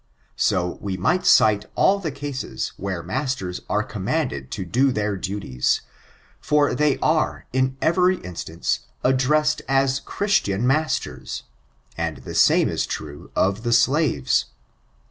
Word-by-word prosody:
'* - - -39
So 90 -1 -1
we 95 -2 -3
might 175 - +1
cite 105 -1 +5
all 200 +1 +4
the 175 -5 -3
cases 140 -1 -4
where 95 -3 -4
masters 130 -10 -3
are 105 0 +1
conmianded 105 - -2
to 95 - -4
do 130 +9 +2
their 105 -3 -1
duties; 90 -10 -1 0.6
for 150 -1 +2
they 150 -2 +2
are, 155 0 +1
in 130 0 +1
erery 180 +3 +3
instance, 80 -7 -3 0.2
addressed 150 +4 +2
as 135 0 +2
Chrittian 155 - 0
masters; 125 - -1 0.5
and - - -3
the - - -7
same - - +4
18 - - -1
true 75 - -7
of 100 +3 +1
the 120 0 -1
slaves. 130 - +2
130 Hz, 135 wpm, -23 LUFS, 95-150 Hz, 0.6 s, cite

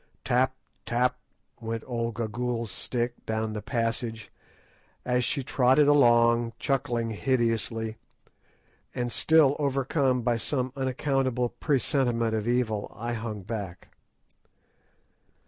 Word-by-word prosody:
Tap, 130 +2 +2 0.3
tap, 125 +1 0 0.4
went 115 0 -4
old 115 -2 -3
Gagool's 115 0 -2
stick 120 +3 -3
down 110 0 -1
the 105 - -4
passage, 115 -1 -2 0.7
as 125 0 +1
she 135 +3 -1
trotted 130 +3 +4
along, 120 -4 +4
chuckling 120 -4 -1
hideously; 115 -2 0 1.0
and 120 -1 -2
still 155 -1 +4
overcome 135 -2 +1
by 120 0 +1
some 130 +1 -2
unaccountable 130 -2 0
presentiment 120 -5 0
of 110 0 -1
evil, 120 -4 0
I 120 +2 -3
hung 110 -3 -5
back. 100 -4 -6
120 Hz, 105 wpm, -27 LUFS, 115-130 Hz, 1.0 s, trotted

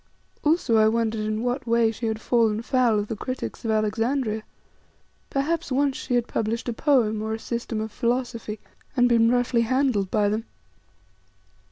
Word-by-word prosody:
Also 300 -7 +3
I 215 0 +5
wondered 225 -1 0
in 215 +1 -2
what 245 +1 -2
way 230 -1 +3
she 225 +1 -4
had 220 -1 -2
fallen 225 -1 +1
foul 245 -3 +2
of 205 0 -1
the 225 - -3
critics 255 +5 -5
of 225 - -2
Alexandria. 220 +2 0 0.9
Perhaps 290 +2 -1
once 275 +1 +2
she 245 - -2
had 240 -1 +2
published 225 +2 -2
a 240 - -1
poem 225 -5 +2
or 220 0 -2
a - - -5
system 235 -1 -4
of 220 0 -4
philosophy 235 -2 -2 0.4
and 245 0 +5
been 230 -1 +4
roughly 245 -1 +2
handled 240 -5 +1
by 210 0 +2
them! 215 +2 -1
230 Hz, 170 wpm, -25 LUFS, 220-250 Hz, 0.9 s, I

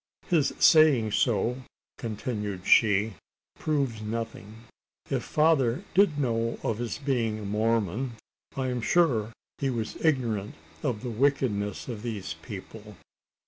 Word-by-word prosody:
"His 160 -6 +2
saying 145 -9 +6
so," 120 +4 +1 0.4
continued 105 -4 -4
she, 105 -1 +4 0.5
"proves 140 -8 -1
nothing. 110 0 -6 0.5
If - - +1
father 150 -2 +2
did 190 -6 +4
know 115 -4 0
of 110 -1 -1
his 120 -1 -3
being 125 -6 -1
a 110 - -7
Mormon, 110 +3 0 0.4
I 130 -1 0
am 125 -1 -2
sure 120 -8 +2 0.3
he 135 - 0
was 115 -4 -4
ignorant 120 -10 0 0.3
of 115 -3 -2
the 125 - -3
wickedness 115 -5 0
of 115 -5 -5
these 105 -8 -4
people. 105 +2 -9
115 Hz, 125 wpm, -27 LUFS, 105-135 Hz, 0.5 s, saying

